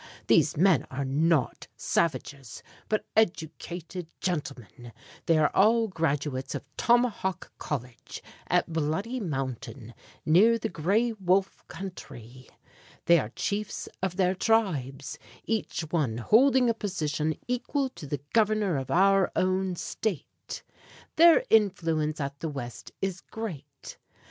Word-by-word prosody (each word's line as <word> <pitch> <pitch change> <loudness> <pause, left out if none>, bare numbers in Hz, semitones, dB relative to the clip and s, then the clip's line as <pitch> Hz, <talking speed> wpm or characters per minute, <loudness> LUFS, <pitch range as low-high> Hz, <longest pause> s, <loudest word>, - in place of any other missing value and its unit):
These - - +3
men 180 -3 +4
are 135 +1 -3
not 150 0 +1
savages, 140 -5 -2 0.3
but 215 - 0
educated 175 -3 -2
gentlemen. 125 - -5 0.3
They 165 - +4
are 155 -1 +3
all 225 +3 +4
graduates 145 -6 -2
of - - -5
Tomahawk 235 -6 +1
College, 125 -5 -6 0.2
at 165 - +1
Bloody 165 +11 -1
Mountain, 130 - -5 0.3
near 210 +9 +5
the 220 0 -3
Gray 210 +9 +1
Wolf 190 -1 0
country. 130 - -9 0.6
They 170 -1 +6
are 110 - -4
chiefs 205 0 -3
of 190 -2 -1
their 185 -1 +2
tribes, 155 - 0 0.3
each 225 -5 -2
one 140 -10 0
holding 250 - +4
a 230 - +3
position 155 -7 -2
equal 255 +3 -1
to 170 - -10
the 140 -1 -3
Governor 215 -6 +2
of 135 -1 -4
our 195 +1 +4
own 185 0 +1
State. 190 0 -5 0.5
Their 335 0 +7
influence 165 -8 +2
at 140 -1 -4
the 160 - -3
West 120 -5 -7
is 190 -1 -2
great. 220 -11 -8
170 Hz, 120 wpm, -27 LUFS, 140-205 Hz, 0.6 s, Their